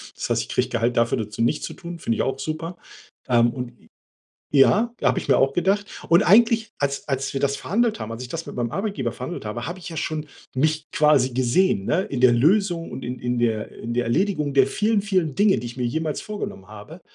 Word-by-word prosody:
Das - - -4
heißt, - - +2
ich - - -8
kriege - - +1
Gehalt 115 +1 -1
dafür 115 -2 +1
zu 115 - -6
nichts 120 +6 +1
zu - - -7
tun, 170 -1 -8
finde 115 -8 -2
ich - - +1
auch 135 0 -2
super. 160 +4 -4 0.5
Ähm, 120 -1 +4
und 125 -2 -5 0.8
ja, 215 - +5
habe - - +2
ich - - -6
mir - - +5
auch 135 +1 +2
gedacht. 195 +3 +1 0.2
Und 170 +5 +6
eigentlich, 225 +2 +5
als 140 +1 -2
als 135 0 -1
wir 135 - -2
das 140 0 +1
verhandelt 220 - 0
haben, 110 +1 -5
als 115 +2 -6
ich 125 - -7
das 165 +4 -5
mit - - -8
meinem 120 -2 -2
Arbeitgeber 195 - -2
verhandelt 130 -1 -6
habe, 120 +3 -4
habe 175 +3 -5
ich 180 - -9
ja 165 - -7
schon 155 -1 -3 0.3
mich 155 +3 +1
quasi 150 -6 +4
gesehen, 125 - +1
ne, 185 +4 +2
in 135 -9 -4
der 125 -1 +6
Lösung 170 - +2
und - - -6
in 125 +1 -4
in 125 0 -2
der 110 -3 0
in 120 +1 -6
der 125 0 +1
Erledigung 150 - 0
der 135 -1 +5
vielen, 215 +7 +1
vielen 185 -8 0
Dinge, 205 -1 +4
die 120 - -5
ich 120 +2 -10
mir 125 - -1
jemals 155 +4 -2
vorgenommen 200 - -6
habe. 110 - -11
140 Hz, 230 wpm, -23 LUFS, 120-180 Hz, 0.8 s, Und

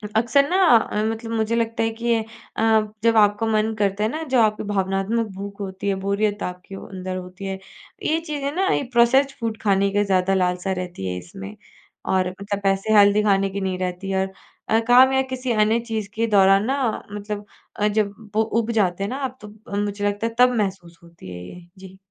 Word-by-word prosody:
अक्सर 245 +5 +3
ना 370 - +2 0.2
अ, 210 -1 -1
मतलब 225 +1 -3
मुझे 225 0 0
लगता 230 0 0
है 225 - +1
कि 235 -1 +2
अ, 220 - -5 0.8
जब 230 -1 +4
आपका 205 +1 +4
मन 220 0 +1
करता 200 +1 +1
है 215 - +1
ना, 315 +5 -4
जो 260 -5 +1
आपकी 215 -1 +1
भावनात्मक 195 +4 0
भूख 200 +1 -7
होती 190 +1 -5
है, 195 - +1
बोरियत 205 +1 0
आपके 180 +2 -7
वो - - -9
अंदर 185 -1 -6
होती 185 +2 -8
है, 190 0 -4 0.4
ये 320 +1 +1
चीज़ें 290 -3 -4
ना 380 +1 +1
ये - - 0
प्रोसेस्ड 265 +4 +4
फूड 225 -2 -3
खाने 200 -1 +2
का 205 0 +3
ज़्यादा 190 -1 +1
लालसा 180 0 0
रहती 175 - -6
है 90 0 -3
इसमें, 195 - -10 0.5
और 185 -1 +1
मतलब 200 +2 -5
ऐसे 195 +3 +1
हेल्दी 205 +1 +5
खाने 195 -1 +2
की 200 +1 -5
नहीं 190 -1 -2
रहती 185 +1 -4
है। 190 0 +1
और 190 - -16 0.4
अ, 225 - +4
काम 255 +2 +7
या 265 - +3
किसी 255 -1 -3
अन्य 215 +1 +3
चीज़ 215 -3 -3
के 230 +1 0
दौरान 195 -1 +4
ना 270 +3 0 0.3
मतलब 205 0 -5 0.3
अ, 210 - +1
जब 205 -1 0 0.2
वो 220 - +4 0.2
ऊब 230 0 -2
जाते 195 -4 +1
हैं 200 - -2
ना 260 - -4
आप 260 0 -6
तो 210 - -9 0.2
अ, 200 - -3
मुझे 205 0 -2
लगता 205 +2 -1
है 230 - -6
तब 250 0 +6
महसूस 185 -5 -3
होती 170 - -13
है 90 0 -8
ये। 180 -1 -12
जी। 190 0 -12
205 Hz, 215 wpm, -22 LUFS, 195-225 Hz, 0.8 s, काम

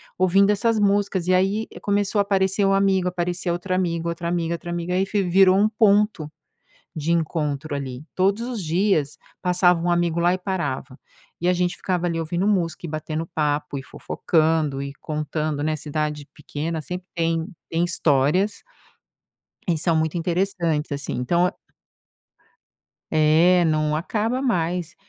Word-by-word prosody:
ouvindo 195 +2 +4
essas 225 +2 +1
músicas 200 -3 +1
e 185 - +3
aí, 195 +4 +1
começou 205 0 0
a - - +6
aparecer 195 0 +1
um 195 - +3
amigo, 195 -2 +2
aparecia 180 0 -2
outro 175 +2 -2
amigo, 170 -2 -1
outra 170 0 -4
amiga, 170 -1 -1
outra 170 +1 -6
amiga 175 +1 -3
e - - +1
aí 190 - +2
fe 205 0 0
virou 185 +1 +5
um 205 +2 +4
ponto 210 -7 +2 0.6
de 155 +1 -1
encontro 155 -3 -1
ali, 130 -2 -6
todos 195 +4 +1
os 235 -5 -4
dias 165 -3 +1 0.2
passava 180 -1 +3
um 175 - +1
amigo 170 -1 +1
lá 175 +1 +3
e - - -3
parava. 170 -8 -3 0.4
E 175 - -1
a - - +5
gente 180 0 0
ficava 180 -2 -1
ali 170 -1 -1
ouvindo 170 +4 -1
música, 175 -5 0
e - - -7
batendo 155 +1 -3
papo, 145 -2 -1
e - - -6
fofocando 155 -1 0
e 140 0 -5
contando 150 -1 -3
né, 155 +1 0
cidade 150 0 -3
pequena 155 +2 -4
sempre 180 +4 -6
tem 165 -1 0 0.2
tem 165 +1 +1
histórias 170 +4 +1 1.1
e 170 -3 +2
são 165 +2 +1
muito 160 +1 0
interessantes, 170 -3 -1
assim, 140 0 -3
então 170 +9 +2
é 190 - -5 1.6
É, 160 +4 +4
não 155 -1 +1
acaba 220 +9 -1
mais, 180 - -1
175 Hz, 160 wpm, -23 LUFS, 155-190 Hz, 1.6 s, a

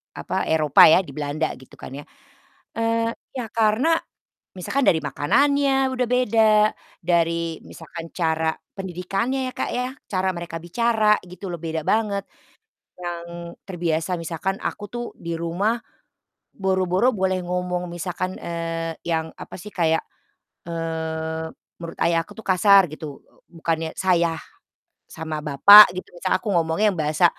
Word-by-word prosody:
apa, - - -3
Eropa 155 -3 +6
ya, 160 - +7
di - - -11
Belanda 150 +1 -2
gitu 130 - -16
kan, - - -10
ya, 145 +2 -7 0.8
eee, 230 0 +1 0.2
ya 250 -3 -3
karena, 230 +9 +2 0.6
misalkan 270 +10 -1
dari 160 - +4
makanannya 270 - +2
udah 250 -1 0
beda, 225 -3 +3 0.5
dari 170 -2 0
misalkan 165 0 -10
cara 160 -2 0 0.2
pendidikannya 195 +8 -2
ya, - - -16
Kak, - - -2
ya, 250 +1 -1 0.2
cara 190 -1 0
mereka 170 -1 -6
bicara 215 +5 +2
gitu 180 +3 -10
loh, - - -3
beda 160 -1 -3
banget. 205 -3 0 0.8
Yang, 170 0 -7
terbiasa 170 -2 -2
misalkan 170 +4 -3
aku 205 - -4
tuh 240 0 -3
di 170 0 -5
rumah, 185 +8 -1 0.7
boro-boro 190 +5 +1
boleh 190 -1 0
ngomong 180 0 -2
misalkan, 180 +2 -4
eee, 165 -1 -3 0.2
yang, 160 -1 -1
apa - - -9
sih 210 +3 -10
kayak, 160 -2 +1 0.6
eee, 160 -1 -3 0.3
menurut 165 0 -8
ayah 165 -1 +2
aku - - -14
tuh 220 - -9
kasar 195 0 +6
gitu, 155 -2 -8 0.3
bukannya 165 -1 -2
"Saya," 170 -3 +2 0.8
sama 160 -1 -5
bapak 200 +9 +9
gitu 185 - -6
misalnya 185 +1 0
aku 205 +1 -3
ngomongnya 165 +5 +2
yang 175 - -7
bahasa, 155 +3 +2
175 Hz, 140 wpm, -23 LUFS, 165-205 Hz, 0.8 s, bapak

